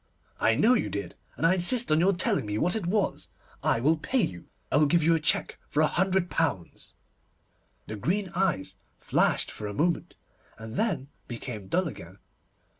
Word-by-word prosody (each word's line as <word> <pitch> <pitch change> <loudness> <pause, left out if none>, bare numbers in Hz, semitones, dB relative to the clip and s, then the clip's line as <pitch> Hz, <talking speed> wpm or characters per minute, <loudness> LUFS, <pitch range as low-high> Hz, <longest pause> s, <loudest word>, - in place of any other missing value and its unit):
'I 115 - +3
know 230 - +4
you 245 - 0
did, 100 -4 -5 0.2
and - - 0
I 165 - +5
insist 190 +4 +3
on 155 - +4
your 185 +4 +4
telling 175 - 0
me 105 0 -2
what 175 - +2
it 205 -6 -2
was. 200 +1 -1 0.3
I - - +1
will 155 +7 +2
pay 250 +9 0
you. 90 - -5 0.2
I - - +3
will 150 0 +4
give 170 +2 +2
you 165 +2 +4
a 165 - +2
cheque 150 - 0
for 150 - +1
a - - +5
hundred 190 +2 +1
pounds.' 145 - -3 0.9
The 110 - -6
green 190 - -1
eyes 180 - -1 0.2
flashed - - +1
for 105 - -6
a 100 - -6
moment, 170 +7 -1 0.4
and 110 +1 -9
then 160 - -1 0.2
became 115 -4 -7
dull 180 - +1
again. 95 - -10
160 Hz, 190 wpm, -27 LUFS, 110-185 Hz, 0.9 s, I